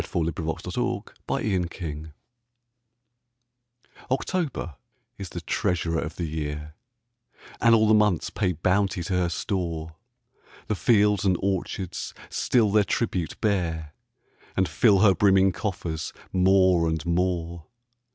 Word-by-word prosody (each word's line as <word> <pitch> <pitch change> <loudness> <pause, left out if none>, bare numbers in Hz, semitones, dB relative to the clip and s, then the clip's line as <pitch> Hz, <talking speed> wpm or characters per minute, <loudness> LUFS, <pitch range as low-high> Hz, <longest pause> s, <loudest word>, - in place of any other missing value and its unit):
Paul 85 -1 -1
Laurence 80 0 -3
Dunbar - - -3 0.2
October 85 -6 -3 1.9
OCTOBER 135 - -2 0.4
is 95 -2 -6
the 85 - -6
treasurer 85 0 -1
of 80 - -5
the 85 - -3
year, 75 -1 -4 0.9
And 115 -1 +6
all 110 -1 +4
the 110 - +5
months 105 -5 +2
pay 95 -4 0
bounty 95 +2 +1
to 90 - -3
her 90 -1 +1
store: 85 -2 -3 0.7
The 110 - -1
fields 105 -2 +3
and 95 -3 +2
orchards 95 -1 -3 0.2
still 110 -5 +2
their 105 0 +4
tribute 95 -5 -2
bear, 80 -7 -1 0.6
And 95 - +3
fill 100 +5 +4
her 105 -3 +6
brimming 95 +1 +4
coffers 85 -4 -4 0.2
more 95 -2 +4
and 80 -1 -2
more. 85 -2 -1
90 Hz, 120 wpm, -25 LUFS, 80-100 Hz, 1.9 s, And